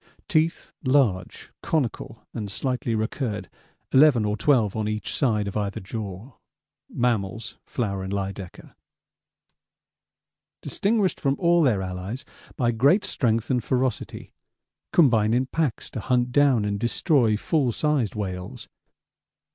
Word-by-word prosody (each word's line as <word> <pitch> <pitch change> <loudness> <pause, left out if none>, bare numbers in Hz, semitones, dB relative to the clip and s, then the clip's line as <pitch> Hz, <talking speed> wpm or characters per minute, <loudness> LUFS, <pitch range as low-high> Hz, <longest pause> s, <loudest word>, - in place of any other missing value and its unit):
Teeth, 160 0 0
large, 130 -10 +1
conical, 130 -6 -2
and 105 -4 -4
slightly 125 +1 -1
recurred, 110 - -3 0.4
11 130 -5 +5
or 105 0 0
12 110 -3 +2
on 110 -1 -1
each 110 0 -3
side 110 -6 +1
of 100 - -5
either 100 -2 -2
jaw. 100 +3 -6 0.6
'Mammals' 110 -3 -2
Flower 100 -5 -2
and 95 0 -5
Lydekker: 100 -2 -5 1.9
'Distinguished 200 -2 0
from 135 -1 +1
all 175 -1 +3
their 110 -10 +2
allies 95 +9 -5 0.3
by 120 -2 +1
great 140 - +3
strength 115 -3 0
and 125 -3 +1
ferocity.' 130 0 -2 0.6
'Combine 115 -8 +4
in 130 +2 +2
packs 150 -3 -2
to 125 - -5
hunt 125 +2 +1
down 135 -5 +4
and 100 -1 -2
destroy... 120 - +2
full 135 +2 +1
sized 140 -4 0
whales.' 95 -3 -5
115 Hz, 125 wpm, -25 LUFS, 105-135 Hz, 1.9 s, 11